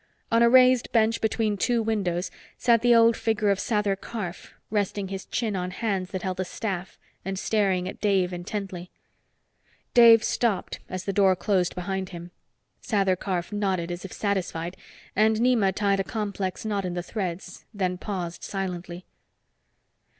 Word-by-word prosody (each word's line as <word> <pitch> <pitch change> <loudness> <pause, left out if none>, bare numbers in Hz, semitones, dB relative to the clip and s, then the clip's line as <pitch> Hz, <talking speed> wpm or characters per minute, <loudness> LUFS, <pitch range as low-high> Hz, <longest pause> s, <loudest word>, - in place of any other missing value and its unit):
On 230 0 +4
a 235 - +6
raised 255 0 +5
bench 225 -1 +2
between 220 -1 0
two 235 +4 +1
windows 195 -5 -1 0.3
sat 235 -2 +3
the 240 0 +5
old 230 0 +6
figure 215 -3 +1
of 195 - 0
Sather 210 -3 0
Karf, 195 -3 -7 0.2
resting 205 -2 -1
his 195 -1 -6
chin 220 -4 -1
on 180 -1 -2
hands 190 -2 -2
that 185 -2 -5
held 185 -1 -3
a - - +1
staff 190 -1 -5 0.3
and 195 0 -3
staring 190 -3 +1
at 190 - -8
Dave 190 -3 +2
intently. 180 0 -5 1.0
Dave 230 -2 +8
stopped 225 -6 -1
as 185 0 -5
the 195 - -1
door 190 -1 +4
closed 185 -1 0
behind 190 +1 -3
him. 175 -1 -9 0.5
Sather 195 -4 +1
Karf 180 -1 -3
nodded, 190 -4 -1
as 175 0 -5
if 195 - -8
satisfied, 180 -4 -2 0.4
and 220 +2 +4
Nema 225 -4 +3
tied 200 -1 +1
a - - +1
complex 200 -2 -4
knot 205 -2 -1
in 180 -1 -3
the 175 - -3
threads, 185 -2 -5
then 185 -4 -2
paused 180 -5 -4
silently. 180 -2 -5
195 Hz, 160 wpm, -26 LUFS, 185-220 Hz, 1.0 s, Dave